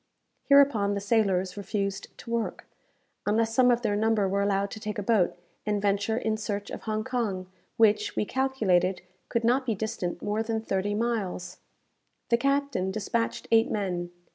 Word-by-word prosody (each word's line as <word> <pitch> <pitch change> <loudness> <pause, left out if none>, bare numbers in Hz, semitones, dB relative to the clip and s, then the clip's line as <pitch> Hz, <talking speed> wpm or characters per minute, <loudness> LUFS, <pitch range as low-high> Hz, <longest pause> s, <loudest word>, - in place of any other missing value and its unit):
Hereupon 270 -8 +5
the - - -1
sailors 195 -3 +1
refused 200 -1 -3
to 235 - -9
work, 230 -1 -2 0.6
unless 225 +2 +2
some 250 +1 +5
of 240 0 +2
their 210 -2 +1
number 215 -1 +2
were 200 +1 0
allowed 200 0 +1
to 220 - -7
take 210 0 -4
a 205 - -2
boat, 195 -5 +2 0.3
and 210 -1 0
venture 205 +2 +1
in 220 -2 0
search 205 -1 -4
of - - -6
Hong 215 -1 -2
Kong, 225 -7 -2 0.3
which, 210 -1 +3
we - - 0
calculated, 195 -9 +1 0.3
could 235 - 0
not 250 +4 +3
be 235 -4 -1
distant 185 -4 -4
more 210 +1 0
than 225 0 -1
thirty 205 -1 -1
miles. 205 -6 -2 0.7
The 235 - +4
captain 275 -7 0
despatched 220 +3 -2
eight 225 0 +5
men. 180 -4 -2
210 Hz, 165 wpm, -27 LUFS, 200-230 Hz, 0.7 s, Hereupon